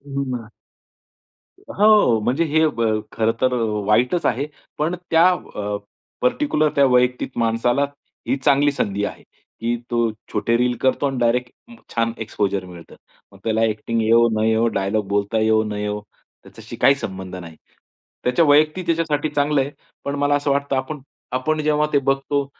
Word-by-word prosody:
हो 140 - 0
ना. 115 -3 -8 1.1
हो, 210 - +4
म्हणजे 130 +8 +1
हे 160 +1 +2
ब 115 -6 -1 0.3
खरं 115 0 +1
तर 130 0 +2
अ, 120 -2 0 0.2
वाईटच 125 +11 +2
आहे. 125 +4 +1 0.3
पण 160 +4 0 0.2
त्या 165 +2 +6
अ, 105 - -4 0.4
पर्टिक्युलर 250 - +1
त्या 140 - +5
वैयक्तिक 125 0 +2
माणसाला 120 +4 +1 0.4
ही - - +2
चांगली 140 +1 +3
संधी 100 -7 -2
आहे - - -7 0.4
की 120 +1 0 0.2
तो 120 -1 +2 0.2
छोटे 115 +2 +1
रील 125 0 +1
करतो 130 +2 +1
आणि 135 -1 -3
डायरेक्ट 120 +1 +1 0.4
छान 115 0 +1
एक्सपोजर 100 -3 -2
मिळतं. 90 -2 -12 0.4
मग 100 - -16
त्याला 110 0 0
ॲक्टिंग 115 +1 0
येवो 115 +2 +4
न - - +1
येवो, 110 +1 +2
डायलॉग 105 -1 -1
बोलता 100 +2 0
येवो 110 0 +3
न 105 -1 -4
येवो, 105 0 -3 0.4
त्याच्याशी - - -11
काही 140 - +4
संबंध 95 -7 -6
नाही. 85 -3 -9 0.7
त्याच्या 125 +7 +3
वैयक्तिक 155 +4 +3
त्याच्यासाठी 160 -3 0
चांगलं 145 -1 +1
आहे. 135 +2 -3 0.3
पण 140 - -3
मला 145 0 +2
असं 145 0 0
वाटतं 140 0 0
आपण 135 +3 -3 0.3
आपण 155 +5 0
जेव्हा 150 0 +2
ते - - +5
बघतो 135 +1 0
125 Hz, 160 wpm, -21 LUFS, 110-145 Hz, 1.1 s, त्या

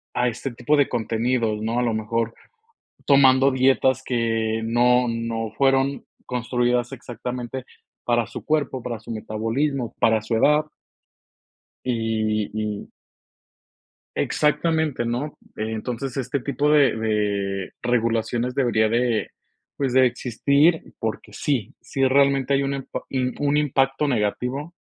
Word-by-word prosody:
a 125 0 +2
este 125 +3 -3
tipo 145 +5 +1
de 145 - +3
contenidos, 115 -1 0
¿no? 115 +2 -1
A - - +1
lo 115 -2 +1
mejor 115 +1 -1 0.7
tomando 135 -1 +5
dietas 130 0 +3
que 115 -2 0
no 125 +2 +3
no 115 -1 -3
fueron 135 0 +2 0.2
construidas 125 0 0
exactamente 125 0 -6 0.4
para 120 -2 +1
su 120 - -8
cuerpo, 150 -4 0
para 115 -3 -5
su - - -12
metabolismo, 115 +4 -2
para 110 -1 +3
su 110 +1 -2
edad. 150 +6 +4 1.2
Y 110 -3 0
y. 105 -1 -3 1.3
Exactamente, 155 -4 +1
¿no? 125 +6 -3 0.2
Entonces, 115 +4 -4
este 135 +2 -1
tipo 140 +3 0
de 145 -6 +4
de 100 -3 -1
regulaciones 120 +1 0
debería 110 -5 +2
de, 120 -1 +1 0.5
pues, 135 -3 -1
de 130 -1 +6
existir, 140 +7 +1
porque 110 -1 -4
sí, 125 -8 -2
sí 135 - -2
realmente 140 0 +3
hay 140 - +1
un 135 - -1
empa 135 -1 -5
im 130 -1 -1
un 145 0 +2
impacto 135 0 +1
negativo 125 +6 -1
125 Hz, 125 wpm, -23 LUFS, 115-135 Hz, 1.3 s, de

